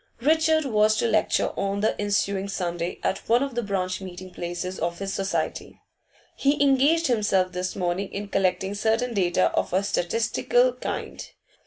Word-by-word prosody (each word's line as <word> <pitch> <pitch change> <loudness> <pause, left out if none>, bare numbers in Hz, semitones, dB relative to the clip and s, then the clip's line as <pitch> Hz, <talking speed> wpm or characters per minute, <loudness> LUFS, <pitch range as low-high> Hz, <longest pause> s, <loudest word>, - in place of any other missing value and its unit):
Richard 315 +2 +3
was 215 -3 +3
to 235 - +1
lecture 215 -2 +2
on 200 0 -1
the 215 - +1
ensuing 200 -1 0
Sunday 175 -2 -3
at 190 - 0
one 240 +3 +4
of 275 -2 -4
the 240 - -1
branch 190 -3 -2
meeting 185 0 -8
places 175 +2 -5
of 170 +1 -2
his 195 0 -4
society; 195 0 -3 0.6
he 280 +1 +1
engaged 285 +4 +4
himself 205 - +2
this 180 0 -3
morning 185 +1 -2
in 205 +1 -5
collecting 190 0 0
certain 225 +4 0
data 185 -2 +2
of - - -1
a 190 +2 +2
statistical 230 - +1
kind. - - -5
200 Hz, 160 wpm, -25 LUFS, 185-235 Hz, 0.6 s, one